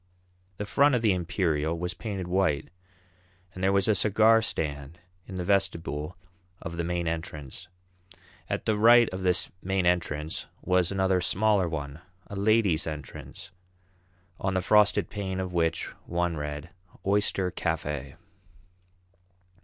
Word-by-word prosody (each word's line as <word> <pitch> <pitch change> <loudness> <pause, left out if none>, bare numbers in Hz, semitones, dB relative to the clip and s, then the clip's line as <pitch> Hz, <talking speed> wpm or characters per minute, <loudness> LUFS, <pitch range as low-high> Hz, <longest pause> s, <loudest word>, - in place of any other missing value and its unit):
The 105 - -3
front 140 +5 +4
of 120 - 0
the 105 -4 +4
Imperial 85 -3 0
was 90 +2 -3
painted 100 -5 -5
white, 90 -5 +1 0.8
and 95 - -7
there 95 - +4
was 100 -1 +2
a 110 - +5
cigar 110 +3 +4
stand 75 -6 -3 0.3
in 95 - -7
the 90 - -3
vestibule 85 -4 -1 0.4
of 85 - -6
the 85 - -1
main 85 0 -2
entrance. 80 -4 -5 0.8
At - - -2
the 105 -1 +1
right 120 +1 +7
of 95 0 -5
this 90 -1 +1
main 95 -1 0
entrance 80 -3 -1 0.2
was 90 -1 +2
another 95 -1 +2
smaller 100 -1 +2
one, 75 -1 -5 0.2
a 100 - -8
ladies' 100 -5 +2
entrance, 75 +3 -8 0.9
on 95 0 -1
the 95 - +1
frosted 105 +1 +4
pane 95 -2 -3
of 95 -1 -4
which 80 -1 0 0.2
one 85 -1 0
read, 75 +2 -5 0.3
"Oyster 100 -2 +1
Cafe." 75 -6 -3
90 Hz, 140 wpm, -27 LUFS, 80-100 Hz, 0.9 s, right